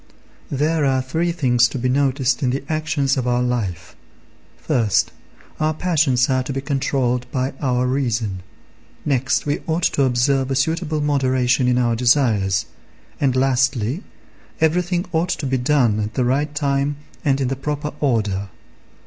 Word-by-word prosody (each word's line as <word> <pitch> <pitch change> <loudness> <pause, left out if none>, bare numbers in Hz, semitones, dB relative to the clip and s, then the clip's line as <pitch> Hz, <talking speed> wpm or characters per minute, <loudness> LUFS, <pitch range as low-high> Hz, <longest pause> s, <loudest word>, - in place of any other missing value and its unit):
There 150 +3 0
are 135 -1 +2
three 160 +7 -1
things 125 -7 +3
to 135 - -6
be 130 0 -1
noticed 135 0 +1
in 130 - +1
the 135 +2 -2
actions 155 -3 0
of 125 -1 -1
our 125 0 +1
life. 115 -9 -3 0.6
First, 115 -9 +1 0.5
our 155 0 +1
passions 150 -8 +2
are 130 -1 +1
to 130 - -5
be 135 - -2
controlled 135 -3 -1
by 130 +1 -1
our 125 -2 +1
reason; 120 -7 -1 0.6
next, 135 -1 +1
we 145 0 -1
ought 165 +1 -1
to 140 - +2
observe 130 +2 +1
a 135 - 0
suitable 160 +2 0
moderation 130 -3 +1
in 125 0 +2
our 120 -2 +2
desires; 115 - +2 0.5
and, 135 -3 +1
lastly, 130 - +1 0.6
everything 175 +3 +1
ought 170 +1 0
to 165 - -2
be 130 -1 0
done 125 -5 +2
at 105 +1 -3
the 125 - +1
right 145 +4 0
time 140 0 0 0.3
and 140 -2 +2
in 130 -2 0
the 135 - -1
proper 150 +2 -4
order. 105 -8 0
135 Hz, 155 wpm, -21 LUFS, 125-145 Hz, 0.6 s, things